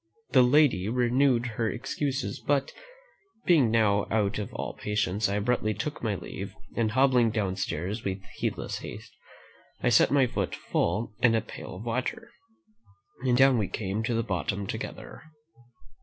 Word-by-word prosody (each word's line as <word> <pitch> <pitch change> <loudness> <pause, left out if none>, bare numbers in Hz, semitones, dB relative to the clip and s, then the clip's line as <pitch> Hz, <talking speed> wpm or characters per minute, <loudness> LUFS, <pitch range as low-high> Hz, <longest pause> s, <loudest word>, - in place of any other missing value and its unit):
The - - +6
lady 125 -7 +4
renewed 125 +1 +2
her 115 -1 -1
excuses; 140 +4 -3
but, 140 -1 0 0.7
being 150 -10 +5
now 105 -3 +2
out 105 -2 +1
of 105 - -5
all - - -4
patience, 105 -1 -1
I 100 - -1
abruptly 110 0 0
took 145 +9 -4
my 110 -3 0
leave, - - -7 0.2
and 110 -2 0
hobbling 130 -2 +4
downstairs 100 -1 -2
with 95 0 -3
heedless - - -3
haste, - - -9 0.7
I - - +4
set 120 - +5
my 140 -2 +4
foot 105 -6 -2
full 105 +6 -1
in 115 -2 +5
a - - +3
pail 110 - -9
of 95 - -8
water, 180 - -3 0.9
and 125 -2 +3
down 130 -2 +5
we 100 - 0
came 100 +2 -3
to 115 +1 -1
the 115 - +1
bottom 100 0 -2
together." - - -6
115 Hz, 155 wpm, -28 LUFS, 105-125 Hz, 0.9 s, The